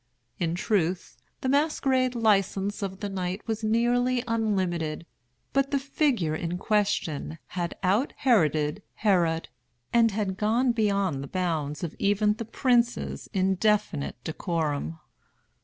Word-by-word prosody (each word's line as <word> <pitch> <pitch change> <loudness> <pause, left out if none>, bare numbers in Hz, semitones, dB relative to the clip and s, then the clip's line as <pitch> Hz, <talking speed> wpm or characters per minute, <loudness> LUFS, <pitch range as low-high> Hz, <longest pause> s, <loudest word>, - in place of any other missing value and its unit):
In 170 -1 0
truth 180 -2 0 0.3
the - - -2
masquerade 265 -3 +2
license 205 -3 +1
of 195 -1 -4
the 205 - -2
night 190 0 -3
was 220 -1 -2
nearly 240 +3 +2
unlimited; 185 -9 -1 0.5
but 275 0 +2
the 280 - +1
figure 270 - 0
in 170 +2 -2
question 190 -7 0
had 175 -2 -3
out 205 +9 +2
Heroded 155 - +2
Herod, 175 -6 +1 0.4
and 215 -4 +2
gone 235 +5 +2
beyond 200 - +1
the 140 - -6
bounds 160 -5 -2
of 165 - -3
even 205 +1 +3
the 225 +2 -6
prince's 240 +1 0
indefinite 190 -5 +1
decorum. 160 -2 -2
200 Hz, 120 wpm, -27 LUFS, 175-230 Hz, 0.5 s, even